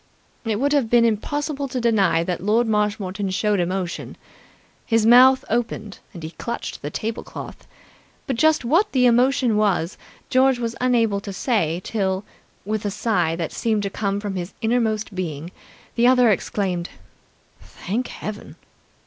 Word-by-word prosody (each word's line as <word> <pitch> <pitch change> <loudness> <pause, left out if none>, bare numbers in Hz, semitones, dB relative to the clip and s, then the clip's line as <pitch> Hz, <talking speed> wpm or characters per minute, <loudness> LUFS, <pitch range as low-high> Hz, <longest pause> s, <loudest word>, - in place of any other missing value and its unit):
It 220 -2 -1
would 285 +3 +1
have 275 -6 +2
been 235 0 +5
impossible 280 +6 -1
to 255 -1 -3
deny 195 -8 +2
that 175 -1 -3
Lord 220 +4 +3
Marshmoreton 205 -2 -1
showed 205 +1 +1
emotion. 180 0 -3 0.7
His 225 -2 +1
mouth 255 +3 +7
opened, 220 -3 -3
and 170 -4 -10
he 160 - -6
clutched 235 +6 -6
the 145 - -4
tablecloth. 220 +8 -6 0.6
But 265 - -2
just 310 0 +3
what 335 - +2
the 255 -2 +4
emotion 245 -1 +3
was 195 -4 0 0.3
George 260 0 +4
was 235 -1 -3
unable 230 -5 +2
to 200 0 -7
say 185 - 0
till, 190 -3 -1 0.4
with 215 0 -2
a 205 - -1
sigh 205 -5 0
that 165 -1 -3
seemed 220 -3 -1
to 200 - -3
come 200 -1 -1
from 205 -2 -4
his 175 +1 -5
innermost 220 -2 0
being, 170 -3 -5 0.4
the 240 +1 +3
other 250 -3 +5
exclaimed 185 -3 -2 0.7
"Thank 230 +7 -4
Heaven!" 210 0 -7
215 Hz, 150 wpm, -22 LUFS, 195-240 Hz, 0.7 s, mouth